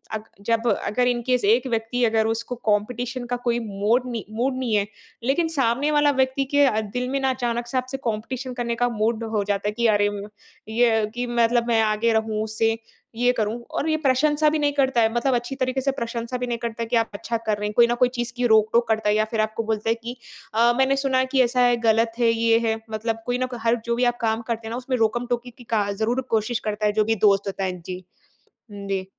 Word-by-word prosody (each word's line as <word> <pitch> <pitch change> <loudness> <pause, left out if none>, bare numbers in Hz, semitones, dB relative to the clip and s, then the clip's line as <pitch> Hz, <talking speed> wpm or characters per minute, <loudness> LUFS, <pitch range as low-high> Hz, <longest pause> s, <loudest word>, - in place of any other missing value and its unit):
अग 215 - -5 0.2
जब 230 +1 +1
अगर 245 +2 +1
इन 240 -1 +1
केस 250 -1 +2
एक 245 +4 +3
व्यक्ति 230 +2 -1
अगर 220 0 +2
उसको 230 +2 -3
कॉम्पिटिशन 245 +4 -1
का 245 0 -2
कोई 240 -1 +1
मोड 215 +5 +1
नहीं 230 -2 -4
मूड 255 +2 0
नहीं 250 -4 -2
है, 200 -1 +2 0.4
लेकिन 285 +7 +1
सामने 275 0 +1
वाला 290 0 +4
व्यक्ति 265 +1 +1
के 270 -7 +4
दिल 250 0 -1
में 275 +1 0
ना - - +3
अचानक 240 -2 -2
से 255 +2 -2
आपसे 255 +1 -2
कॉम्पिटिशन 245 +4 -3
करने 235 -1 -2
का 245 - +3
मूड 220 +2 0
हो 205 - +2
जाता 200 0 -1
है, - - +1
कि 235 - +1
अरे 205 0 +3 0.7
ये 225 -3 +4
कि 245 0 -2
मतलब 235 0 +3
मैं 230 -2 +3
आगे 220 +1 +1
रहूँ 220 -1 0
उससे, 225 +1 0 0.4
ये 245 +2 +3
करूँ 220 +2 -1 0.2
और 320 - -1
ये 315 - +2
प्रशंसा 295 +3 +3
भी 310 - 0
नहीं 290 -1 +1
करता 265 -3 +2
है, 225 0 +2
मतलब 245 +2 +1
अच्छी 240 +3 -3
तरीक़े 255 +1 -1
से 275 +1 +1
प्रशंसा 235 +1 -3
भी 250 - -1
नहीं 235 - -2
करता 230 0 -5
है - - -5
कि 245 - +1
आप - - -18
अच्छा 230 +3 -3
कर 210 - +1
रहे 210 0 -2
हैं। 210 - -5
कोई 235 -1 +6
न - - +1
कोई 245 - +4
चीज़ 240 0 -3
की 245 - +3
रोक-टोक 220 +2 +3
करता 220 -1 +1
है 210 - +3
या 215 0 +2
फिर 220 -1 +1
आपको 220 +1 -2
बोलता 220 +1 -1
है 230 - +3
कि 240 +1 -5 0.4
अ, 235 +2 +4
मैंने 265 +1 +3
सुना 265 -1 +2
है 260 - +3
कि 260 - +6
ऐसा 250 +1 +1
है 245 -1 +3
ग़लत 225 +1 +3
है, 235 - +4
ये 230 0 +3
है 220 0 0
मतलब 225 +1 -3
कोई 245 0 0
न 255 - +1
कोई - - -7
हर 230 +1 +3
जो 235 0 0
भी 245 - 0
आप - - -19
काम 225 0 0
करते 225 -1 -3
हैं - - -6
ना, 235 - -3
उसमें 255 0 -2
रोकम 230 +2 +1
टोकी 245 +1 -4
की 245 - -13
का 205 -1 +1
ज़रूर 225 +5 -1
कोशिश 225 +2 0
करता 210 0 -2
है 210 - +3
जो - - +4
भी - - +3
दोस्त 200 0 +2
होता 195 0 -3
है, 180 -1 -3
जी। 185 +2 -7 0.7
जी। 195 -1 -3
235 Hz, 250 wpm, -23 LUFS, 220-250 Hz, 0.7 s, कोई